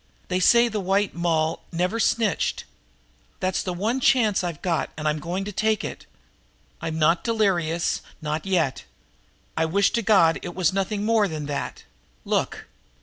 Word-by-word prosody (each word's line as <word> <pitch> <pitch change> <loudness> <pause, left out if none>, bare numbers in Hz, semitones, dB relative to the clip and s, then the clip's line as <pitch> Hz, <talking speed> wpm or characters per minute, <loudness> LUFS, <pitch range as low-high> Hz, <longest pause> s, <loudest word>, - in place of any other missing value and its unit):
They 185 0 +1
say 235 +5 +5
the 215 -2 -3
White 195 +1 +1
Moll 165 -2 0
never 180 +6 -1
snitched. 220 -4 +1 0.8
That's 185 0 0
the 185 - -3
one 215 +9 -1
chance 225 -7 +3
I've 170 -4 -5
got, 165 -5 0
and 155 0 -2
I'm 150 0 0
going 180 +4 -3
to 205 - -4
take 215 +1 0
it. - - -7 0.7
I'm 160 -1 -3
not 165 +2 +3
delirious 180 -7 0 0.2
not 155 +1 -3
yet. 170 -8 0 0.7
I 160 - +1
wish 195 +5 +2
to 235 - 0
God 190 -7 +4
it 175 - -7
was 185 -1 +2
nothing 200 +2 -1
more 220 -2 +3
than 155 -4 -5
that! 140 -3 -4 0.4
Look!" - - -1
185 Hz, 160 wpm, -24 LUFS, 160-210 Hz, 0.8 s, say